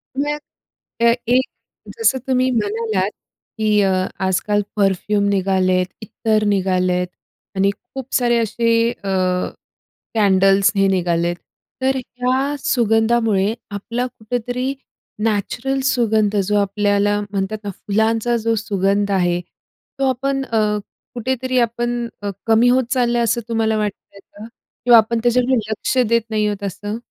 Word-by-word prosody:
मग 295 +2 -1 0.6
अ, 235 0 +6
एक 255 +2 +3 0.5
जसं 275 -13 +3
तुम्ही 255 0 +2
म्हणालात, 215 -3 0 0.5
की 215 -1 +2
अ, 195 -1 +2 0.4
आज-काल 205 +3 +1
परफ्यूम 200 0 +1
निघाले 190 -1 +1
आहेत, 180 0 +1
इत्तर 215 0 0
निघाले 185 -2 +1
आहेत 180 0 0 0.5
आणि 195 +1 +2 0.2
खूप 265 -1 -7
सारे 240 -1 +3
असे 230 +1 -1 0.2
अ, 200 -4 -7 1.1
कँडल्स 195 -2 +4
हे 195 0 +3
निघाले 175 -3 +1
आहेत. 175 0 -2 0.4
तर 265 +1 +1
ह्या 255 +3 -1
सुगंधामुळे 225 -4 +2 0.2
आपला 230 +5 -3
कुठेतरी 245 +2 -3 0.5
नॅचरल 225 +5 -1
सुगंध 220 -5 +2
जो 210 +2 -1
आपल्याला 205 +1 +1
म्हणतात 195 +1 -2
ना 205 - -4
फुलांचा 220 +4 0
जो 230 0 0
सुगंध 200 -1 0
आहे 175 -2 +1 0.6
तो 270 -1 +2
आपण 270 +2 -1
अ, 225 -3 0 0.6
कुठेतरी 255 +1 -1
आपण 240 0 -1
अ, 205 - -3 0.2
कमी 225 +2 +5
होत 255 +1 +3
चालला 240 -2 +2
आहे, - - +2
असं 235 +1 +1
तुम्हाला 220 -1 +1
वाटत 210 -2 -1 0.2
आहे 200 - -14
का? 205 +2 -13 0.4
किंवा 240 -1 +8
आपण 230 +1 +3
त्याच्याकडे 250 +2 +3
लक्ष 220 +4 -2
देत 235 0 +3
नाही 215 -1 +1
आहोत 205 -1 -3
असं? 205 +3 -5
220 Hz, 135 wpm, -19 LUFS, 200-240 Hz, 1.1 s, किंवा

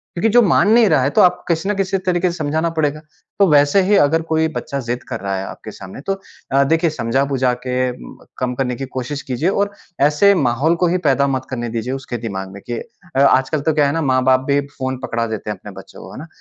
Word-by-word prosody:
क्योंकि 215 +6 +1
जो 245 - +7
मान 200 -1 +3
नहीं 230 -2 +6
रहा 155 -5 +3
है 140 - +2
तो - - +6
आपको 180 0 +3
किसी 170 +3 0
ना 210 - +2
किसी 195 0 0
तरीके 180 0 +1
से 170 - -8
समझाना 155 +2 -1
पड़ेगा। 150 -1 0 0.4
तो 200 - +6
वैसे 145 +6 +5
ही 195 +2 +3
अगर 165 0 +3
कोई 160 0 +2
बच्चा 140 - -3
ज़िद 120 -1 -4
कर - - -4
रहा 100 -1 -3
है 95 - -3
आपके - - -9
सामने 95 +7 -10
तो 195 - +2 0.4
अ, 140 0 +5
देखिए 165 +4 +2
समझा-बुझा 130 -1 0
के 125 0 0
म - - -13
कम 125 -1 -2
करने 125 -1 -1
की 135 +2 -5
कोशिश 130 +2 -5
कीजिए 130 +8 -1
और 200 +1 0 0.3
ऐसे 150 +8 +5
माहौल 140 +3 +1
को 175 +1 +1
ही 180 +2 +1
पैदा 140 0 +3
मत 130 -1 -2
करने 120 -2 -4
दीजिए 115 +3 -3
उसके 135 -2 -5
दिमाग 95 -4 -5
में 100 - -10
कि 120 - -3 0.4
अ, - - +2
आजकल 140 +2 +3
तो 155 +2 +1
क्या 145 -2 +3
है 140 - -1
ना 165 - -1
माँ-बाप 130 -2 +3
भी 140 0 +3 0.2
फ़ोन 130 -1 -3
पकड़ा 115 0 -2
देते 110 -2 -5
हैं - - -3
अपने - - -11
बच्चों - - -12
को, - - -11
है - - -8
ना? 155 - -9
140 Hz, 250 wpm, -19 LUFS, 125-165 Hz, 0.4 s, जो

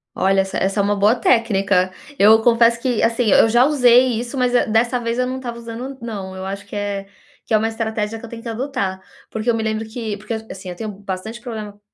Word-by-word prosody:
Olha, 195 0 +3
essa 190 0 -4
essa 195 +2 0
é - - +3
uma 205 +1 +1
boa 205 +3 +3
técnica. 195 -7 +2 0.3
Eu 215 +2 +7
confesso 235 0 +4
que 245 -2 0
assim 230 +2 +2
e 210 - +3
eu 225 - +6
já 240 +3 +5
usei 250 -4 +4
isso, 245 +3 -5
mas, 250 -1 +1
eh, 245 - +3
dessa 235 +3 +2
vez 230 0 -2
eu 250 - +1
não 255 +1 -3
estava 240 -2 -6
usando, 235 +2 -7
n 275 - -9
não. 200 -5 -6
Eu 190 0 -6
acho 200 +1 -5
que - - -9
é 200 -1 -3 0.4
que - - -4
é - - +6
uma 220 +1 0
estratégia 220 -1 -3
que 235 - -9
eu - - -11
tenho 230 0 -8
que - - -7
adotar. 225 -6 -3 0.3
Porque 220 +2 -3
eu 235 - +3
me 225 - -2
lembro 220 0 -2
que 220 -2 -4
porque, 210 +3 -6 0.2
assim, 190 -1 -8
eu 180 - -6
tenho 215 +4 -5
bastante 200 +3 -7
problema 215 -4 -7
225 Hz, 250 wpm, -20 LUFS, 200-240 Hz, 0.4 s, Eu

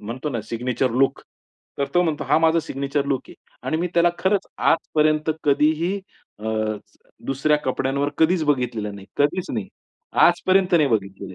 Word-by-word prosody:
म्हणतो 120 +8 -5
ना, 120 -4 -2
signature 125 +3 -1
look 135 +3 +1 0.6
तर 140 - +2
तो 175 - +5
म्हणतो 160 -4 -1
हा - - +3
माझा 165 +1 +3
सिग्नेचर 140 -1 -2
लुक 135 -2 -1
आहे. - - -12 0.3
आणि 155 +4 0
मी 175 +2 -1
त्याला 170 0 +4
खरंच 195 +1 +1
आजपर्यंत 155 -1 +2
कधीही 160 +7 +2 0.4
अ, 110 - -4 0.8
दुसऱ्या 135 +3 +2
कपड्यांवर 135 +2 0
कधीच 165 +1 +3
बघितलेलं 120 -7 -1
नाही. 100 -1 -11
कधीच 145 +6 0
नाही. 110 -5 -3 0.5
आजपर्यंत 185 +1 +4
नाही 150 -3 +3
बघितलेलं. 100 -4 -3
145 Hz, 155 wpm, -22 LUFS, 125-165 Hz, 0.8 s, तो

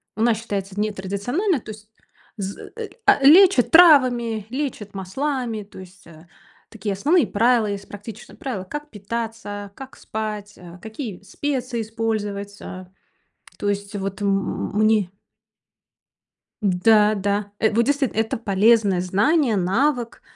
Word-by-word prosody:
Она 225 +3 +3
считается 205 -3 -5
нетрадициональной, 215 - -1
то 220 - -9
есть 215 0 -13 0.5
з 195 0 -6 0.3
а, 345 -9 +4
лечат 335 -2 +7
травами, 255 - +5
лечат 250 -7 -4
маслами, 230 +3 -3
то 195 -1 -14
есть, 185 0 -14
э, 160 0 -16 0.4
такие 205 -2 -4
основные 290 - +2
правила, 230 +1 +2
есть 200 -1 -5
практичные 205 +2 -10
правила, 235 -9 -4
как 295 +9 -7
питаться, 220 -1 -5
а, - - -12
как 265 +6 -12
спать, 210 -1 -5
э, 175 0 -12
какие 220 -3 -7
специи 255 -1 -3
использовать. 210 -2 -3
Э, 185 -1 -8 0.7
то 205 - -2
есть 200 0 -3
вот 195 +1 -4
м 195 -1 -1
мне 215 -3 +3 1.5
Да, 210 +2 +4
да, 200 +1 -1
э, 220 - +2
вот 235 - +3
действительно, 280 -5 0
это 225 0 -1
полезное 205 -2 +3
знание, 225 - +2
навык 235 +6 0
215 Hz, 130 wpm, -22 LUFS, 200-245 Hz, 1.5 s, лечат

